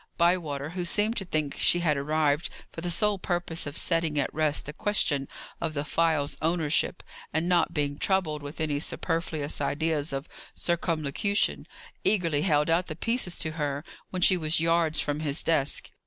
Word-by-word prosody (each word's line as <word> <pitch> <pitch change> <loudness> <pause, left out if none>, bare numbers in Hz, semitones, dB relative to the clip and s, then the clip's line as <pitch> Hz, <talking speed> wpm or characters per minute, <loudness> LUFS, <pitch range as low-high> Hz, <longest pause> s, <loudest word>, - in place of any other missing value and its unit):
Bywater, 160 -5 +1
who 180 0 -3
seemed 210 +6 +1
to 195 - -3
think 155 -4 -2
she 175 - +4
had 155 -4 +2
arrived 150 +2 +1 0.2
for 165 - -7
the 175 - -2
sole 200 +3 +1
purpose 175 -3 0
of 145 - -5
setting 165 -3 +2
at 140 - -1
rest 155 -1 +1
the 150 - -7
question 145 -8 +1 0.3
of 160 -2 -2
the 145 0 -2
phial's 155 -2 +1
ownership, 165 0 +1 0.3
and 160 +2 0
not 175 -1 +3
being 145 -1 -1
troubled 175 -6 +1
with 145 +3 -8
any 150 -2 0
superfluous 160 -2 -2
ideas 155 0 0
of 135 +2 -4 0.3
circumlocution, 170 +3 0 0.4
eagerly 165 -8 +2
held 150 -4 +2
out 170 +2 +2
the 155 - -5
pieces 230 -1 0
to 160 - -1
her 145 -2 -3 0.3
when 185 -1 -2
she 185 - +6
was 155 -1 +3
yards 165 -1 +2
from 145 0 -1
his 150 -1 -1
desk. 145 -4 0
160 Hz, 170 wpm, -27 LUFS, 150-175 Hz, 0.4 s, she